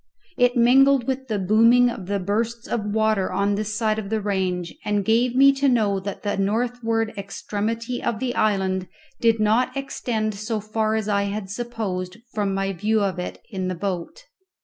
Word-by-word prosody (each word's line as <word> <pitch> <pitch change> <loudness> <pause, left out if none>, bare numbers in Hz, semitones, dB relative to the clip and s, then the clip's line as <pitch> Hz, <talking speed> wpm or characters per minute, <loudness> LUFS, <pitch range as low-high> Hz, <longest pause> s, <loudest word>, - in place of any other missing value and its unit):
It 245 0 +3
mingled 265 +2 +5
with 265 0 -3
the 215 -3 -1
booming 230 +6 +5
of 185 -5 -8
the 200 0 0
bursts 225 +5 -2
of 225 -3 -2
water 215 -2 +1
on 200 +1 +1
this 210 +1 -2
side 215 -2 -1
the 220 0 0
range, 185 -4 -2
and 205 -1 0
gave 235 +2 +2
me 275 +1 +7
to 275 0 +2
know 210 -5 +2
that 200 +1 -6
the 205 -1 -1
northward 225 +2 0
extremity 215 +4 -3
of 230 - -1
the 250 +1 -2
island 190 -4 0 0.3
did 230 -2 +3
not 235 +5 +2
extend 230 -5 -2
so 215 +2 -3
far 215 +1 -1
as 220 -2 -2
I 200 -1 +1
had 200 -1 -4
supposed 205 -5 -4 0.2
from 205 -2 0
my 195 0 -1
view 215 +5 +1
of 190 -2 -1
it 180 - -6
in 190 -3 -3
the 185 - -2
boat. 190 - -4
215 Hz, 180 wpm, -23 LUFS, 200-235 Hz, 0.3 s, me